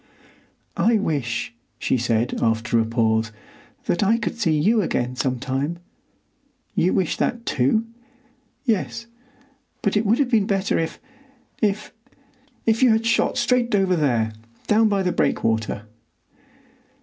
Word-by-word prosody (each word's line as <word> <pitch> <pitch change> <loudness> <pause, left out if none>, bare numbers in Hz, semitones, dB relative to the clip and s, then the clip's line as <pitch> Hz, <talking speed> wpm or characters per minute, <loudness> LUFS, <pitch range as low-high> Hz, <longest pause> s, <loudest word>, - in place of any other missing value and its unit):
"I 230 0 +3
wish," 140 - -2 0.2
she - - 0
said, 120 -1 0
after 115 +1 +1
a 115 - +2
pause, 110 -1 +1 0.5
"that 175 - 0
I 215 +3 +3
could 230 - -3
see 165 -10 +1
you 215 +8 +3
again 125 -8 -1
sometime. 135 +5 -2 1.0
You 180 - +2
wish 185 -4 0
that, 235 -1 -1
too?" 140 - +1 0.8
"Yes, 230 0 -1 0.8
but 200 - +1
it 210 - +3
would 220 +2 +3
have 275 -3 0
been 215 -4 +3
better 195 -1 +1
if—if—you 250 - -3
had—shot 225 +1 +2
straight 240 -2 +2
over 190 -2 +2
there—down 115 - 0
by 200 -2 +1
the 180 - +1
breakwater." 110 - 0
190 Hz, 115 wpm, -23 LUFS, -, 1.0 s, I